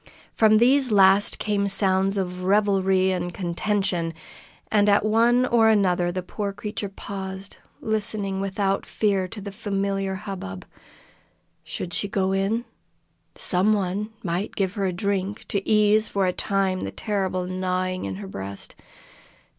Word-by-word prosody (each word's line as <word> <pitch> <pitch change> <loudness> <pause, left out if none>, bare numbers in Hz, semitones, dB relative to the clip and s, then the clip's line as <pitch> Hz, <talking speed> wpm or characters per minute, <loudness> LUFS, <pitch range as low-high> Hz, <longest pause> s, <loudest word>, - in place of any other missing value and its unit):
From 215 -1 +5
these 255 +2 +4
last 195 0 +5
came 205 -1 0
sounds 195 0 +2
of 180 -1 -3
revelry 190 -1 +2
and 180 -1 -2
contention, 175 -2 -1 0.6
and 210 -1 +4
at 200 +1 +3
one 235 +3 +3
or 230 -3 +4
another 180 -5 +2
the 185 +1 -4
poor 200 +2 -4
creature 210 0 -5
paused, 195 0 -7 0.2
listening 205 -2 -1
without 195 0 -1
fear 200 -3 0
to 210 - -7
the 200 0 -7
familiar 195 -2 -2
hubbub. 190 - -7 1.0
Should 175 - -6
she 200 - 0
go 190 -1 0
in? 200 +5 0 0.7
Some 190 +4 +3
one 200 +1 -1
might 180 +2 -3
give 190 -2 -1
her 200 -2 -1
a - - 0
drink, 200 +2 -3
to 200 -1 -2
ease 215 0 +4
for 195 -1 0
a 180 - +1
time 195 -1 0
the - - -4
terrible 190 -4 -2
gnawing 185 - -2
at 95 - -4
her 100 0 -7
breast. 95 +1 -6
195 Hz, 145 wpm, -24 LUFS, 185-210 Hz, 1.0 s, From